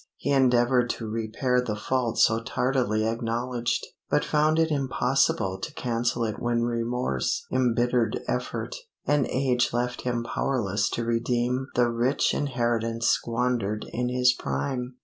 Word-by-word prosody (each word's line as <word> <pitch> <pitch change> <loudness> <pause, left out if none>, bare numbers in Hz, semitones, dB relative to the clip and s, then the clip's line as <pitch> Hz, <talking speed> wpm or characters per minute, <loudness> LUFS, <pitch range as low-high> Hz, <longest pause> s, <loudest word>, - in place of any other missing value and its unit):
He 140 - -2
endeavored 125 -2 +3
to 115 - -3
repair 115 +3 0
the 110 -4 -3
fault 120 +1 -1
so 115 0 +4
tardily 120 -3 0
acknowledged, 115 +1 -1 0.2
but - - +2
found 155 +1 +2
it 160 0 +2
impossible 130 -8 +1
to - - -5
cancel 120 -1 -1
it 110 -2 -3
when 120 0 +1
remorse, 115 - -1
embittered 120 -1 +1
effort, - - -3 0.3
and 145 -2 +2
age 125 -3 +1
left 125 +1 -1
him 120 -1 -1
powerless 110 -5 0
to 115 - -2
redeem 120 +2 0
the 120 -1 +4
rich 120 +4 +1
inheritance 120 -4 0
squandered 115 -3 0
in 125 +1 -1
his 125 0 +4
prime. 125 -1 -3
120 Hz, 135 wpm, -26 LUFS, 115-125 Hz, 0.3 s, so